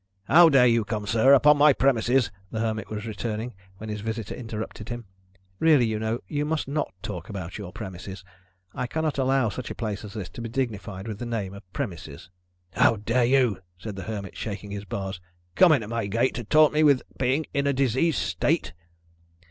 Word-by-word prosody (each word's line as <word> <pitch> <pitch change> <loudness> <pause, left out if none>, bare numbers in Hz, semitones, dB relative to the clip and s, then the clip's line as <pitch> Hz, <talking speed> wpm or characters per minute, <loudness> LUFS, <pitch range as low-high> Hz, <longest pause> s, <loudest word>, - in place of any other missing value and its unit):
"How 165 +10 +7
dare 135 -4 +6
you 115 -2 +4
come, 105 0 -3
sir, 115 +5 +4
upon 150 +2 +5
my 150 0 +7
promises 125 -3 +2
" 95 - -31
the 110 - -3
Hermit 110 -1 -2
was 105 0 -5
returning, 110 +2 -4 0.2
when 110 - -8
his 105 -1 -4
visitor 110 0 -4
interrupted 110 -2 -6
him. 120 -1 -5 0.5
"Really, 155 -6 +5
you 110 -1 -1
know, 110 +2 -2
you 145 -1 -1
must 155 -1 -1
not 145 +2 -2
talk 90 -1 -6
about 95 -2 -6
your 95 -3 -7
premises. 95 -2 -8 0.5
I 125 - -3
cannot 155 0 -2
allow 135 -3 +2
such 125 +4 -6
a - - -5
place 105 -3 -4
as 105 - -9
this 95 -6 -5
to 120 - -9
be 115 - -5
dignified 110 -5 -3
with 105 -2 -5
the 120 - -4
name 105 -5 -3
of 100 -2 -13
premises." 85 - -6 0.4
"How - - +4
dare 115 +4 +1
you," 125 -5 +3 0.2
said 105 +3 -7
the 95 - -6
Hermit, 100 -3 -5
shaking 105 -1 -6
his 100 0 -5
bars, 95 -1 -5 0.3
"come 175 - +6
in 140 -7 +3
at 105 - -8
my 115 -3 -2
gate, 115 +6 +1
to 120 - -5
taunt 155 +6 +5
me 155 - +3
with 145 -4 +4 0.2
being 135 +4 +1
in 140 0 +1
a - - +3
diseased 135 +4 +1
state?" 160 - 0
115 Hz, 205 wpm, -26 LUFS, 105-135 Hz, 0.5 s, How